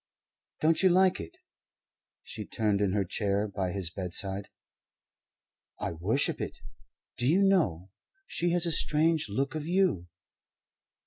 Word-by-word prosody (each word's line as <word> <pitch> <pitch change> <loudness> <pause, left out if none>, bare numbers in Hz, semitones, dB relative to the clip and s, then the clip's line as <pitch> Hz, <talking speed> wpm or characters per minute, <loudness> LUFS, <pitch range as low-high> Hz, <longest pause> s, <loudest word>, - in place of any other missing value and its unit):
"Don't 160 +1 +3
you 190 - +5
like 185 +1 +4
it?" 355 - -9 0.9
She - - -6
turned 105 -3 -1
in 100 -2 +1
her 100 -2 +1
chair 100 +2 -1
by 95 -2 -3
his 90 -3 -2
bedside. 95 +2 -1 1.3
"I - - -2
worship 95 - 0
it. - - -5 0.6
Do 120 - +2
you 180 +7 +4
know, 100 - +1 0.3
she 175 - -1
has 175 0 +3
a 170 - 0
strange 160 -1 +1
look 135 +8 -1
of 155 -1 -4
you? 175 - +1
115 Hz, 135 wpm, -29 LUFS, -, 1.3 s, you